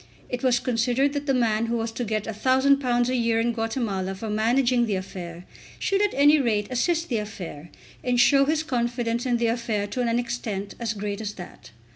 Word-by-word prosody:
It 250 Hz, -1 st, -3 dB
was 250 Hz, -2 st, +3 dB
considered 250 Hz, +4 st, +1 dB
that 290 Hz, 0 st, -3 dB
the 270 Hz, -, +3 dB
man 230 Hz, -2 st, +1 dB
who 235 Hz, +1 st, 0 dB
was 225 Hz, 0 st, -2 dB
to 230 Hz, +2 st, -4 dB
get 215 Hz, -2 st, -1 dB
£1000 255 Hz, +2 st, +2 dB
a 255 Hz, -, 0 dB
year 230 Hz, -2 st, +1 dB
in 235 Hz, +1 st, +1 dB
Guatemala 220 Hz, -5 st, -2 dB
for 215 Hz, +2 st, -5 dB
managing 240 Hz, +3 st, +2 dB
the 205 Hz, -, 0 dB
affair, 180 Hz, -2 st, -7 dB, 0.3 s
should 390 Hz, 0 st, 0 dB
at 415 Hz, -, +1 dB
any 290 Hz, +2 st, +6 dB
rate 215 Hz, -6 st, +1 dB
assist 330 Hz, +7 st, 0 dB
the 240 Hz, -, -1 dB
affair, 175 Hz, -7 st, -7 dB, 0.3 s
and 245 Hz, -1 st, +1 dB
show 275 Hz, +2 st, +5 dB
his 310 Hz, +2 st, +1 dB
confidence 240 Hz, -3 st, -1 dB
in 240 Hz, -1 st, +2 dB
the 235 Hz, -, 0 dB
affair 230 Hz, -3 st, -1 dB
to 225 Hz, +5 st, -3 dB
an 235 Hz, -1 st, +1 dB
extent 235 Hz, -5 st, -3 dB
as 230 Hz, -2 st, -2 dB
great 205 Hz, 0 st, -4 dB
as 210 Hz, -1 st, -4 dB
that. 180 Hz, -3 st, -11 dB
235 Hz, 200 wpm, -25 LUFS, 215-255 Hz, 0.3 s, any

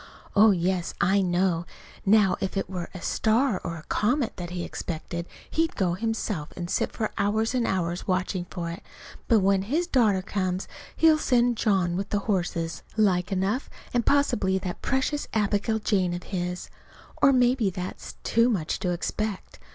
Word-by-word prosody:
"Oh, 215 Hz, +2 st, +7 dB
yes, 180 Hz, -2 st, 0 dB
I 195 Hz, +3 st, +3 dB
know! 175 Hz, -1 st, +1 dB, 0.4 s
Now 205 Hz, -2 st, +5 dB
if 195 Hz, +1 st, -2 dB
it 195 Hz, -, -1 dB
were 180 Hz, -2 st, -5 dB
a 185 Hz, -, -9 dB
star 225 Hz, -1 st, +1 dB
or 170 Hz, -, -3 dB
a 155 Hz, -, -10 dB
comet 245 Hz, -, 0 dB
that 175 Hz, -2 st, -5 dB
he 175 Hz, -1 st, -4 dB
expected, 170 Hz, +1 st, -5 dB, 0.2 s
he'd 325 Hz, 0 st, 0 dB
go 185 Hz, -4 st, +1 dB
himself 210 Hz, -5 st, -2 dB
and 175 Hz, -1 st, -4 dB
sit -, -, 0 dB
for 215 Hz, -2 st, -2 dB
hours 220 Hz, +3 st, +1 dB
and 245 Hz, -2 st, +1 dB
hours 175 Hz, -2 st, -1 dB
watching 185 Hz, -1 st, 0 dB
for 170 Hz, -2 st, -4 dB
it. 170 Hz, -, -8 dB, 0.5 s
But 225 Hz, -4 st, +5 dB
when 195 Hz, 0 st, +3 dB
his 295 Hz, -, 0 dB
daughter 220 Hz, -, +2 dB
comes, 185 Hz, -1 st, -2 dB, 0.3 s
he'll 320 Hz, -1 st, +5 dB
send 245 Hz, -4 st, +3 dB
John 190 Hz, -6 st, +2 dB
with 195 Hz, +2 st, -3 dB
the 205 Hz, -, +1 dB
horses, 170 Hz, -5 st, -1 dB, 0.2 s
like 185 Hz, -3 st, +2 dB
enough, 195 Hz, +7 st, 0 dB, 0.2 s
and 240 Hz, -1 st, +2 dB
possibly 210 Hz, -10 st, +2 dB
that 185 Hz, -2 st, -5 dB
precious 270 Hz, +2 st, 0 dB
Abigail 210 Hz, +1 st, +1 dB
Jane 190 Hz, -5 st, +1 dB
of 175 Hz, -, -6 dB
his. 180 Hz, -2 st, -4 dB, 0.5 s
Or, 280 Hz, -, +7 dB
maybe 250 Hz, -4 st, +3 dB
that 180 Hz, 0 st, -5 dB
is -, -, -10 dB
too 230 Hz, +2 st, +3 dB
much 175 Hz, -9 st, -1 dB
to 185 Hz, -, -1 dB
expect. 195 Hz, +3 st, -3 dB
195 Hz, 175 wpm, -26 LUFS, 180-225 Hz, 0.5 s, Oh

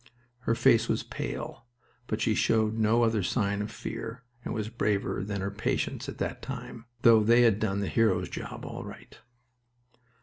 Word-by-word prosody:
Her 115 Hz, -, +4 dB
face 115 Hz, -2 st, +4 dB
was -, -, +1 dB
pale, 120 Hz, -, -6 dB, 0.4 s
but 110 Hz, 0 st, -2 dB
she 110 Hz, -, +2 dB
showed 110 Hz, 0 st, +2 dB
no 110 Hz, +1 st, +3 dB
other 115 Hz, -2 st, +2 dB
sign 100 Hz, 0 st, 0 dB
of 105 Hz, -, -3 dB
fear 115 Hz, +3 st, -6 dB, 0.2 s
and -, -, -4 dB
was 110 Hz, -2 st, -2 dB
braver 105 Hz, -4 st, -1 dB
than 100 Hz, -1 st, -3 dB
her 100 Hz, +1 st, -2 dB
patients 105 Hz, +2 st, -2 dB
at -, -, -7 dB
that -, -, -3 dB
time, 115 Hz, 0 st, -7 dB, 0.2 s
though 115 Hz, -2 st, +7 dB
they 120 Hz, +3 st, +6 dB
had 110 Hz, -3 st, +4 dB
done 100 Hz, -2 st, 0 dB
the 100 Hz, -, -1 dB
hero's 115 Hz, +2 st, +2 dB
job -, -, -7 dB
all -, -, -6 dB
right. -, -, -11 dB
110 Hz, 175 wpm, -29 LUFS, 105-115 Hz, 0.4 s, though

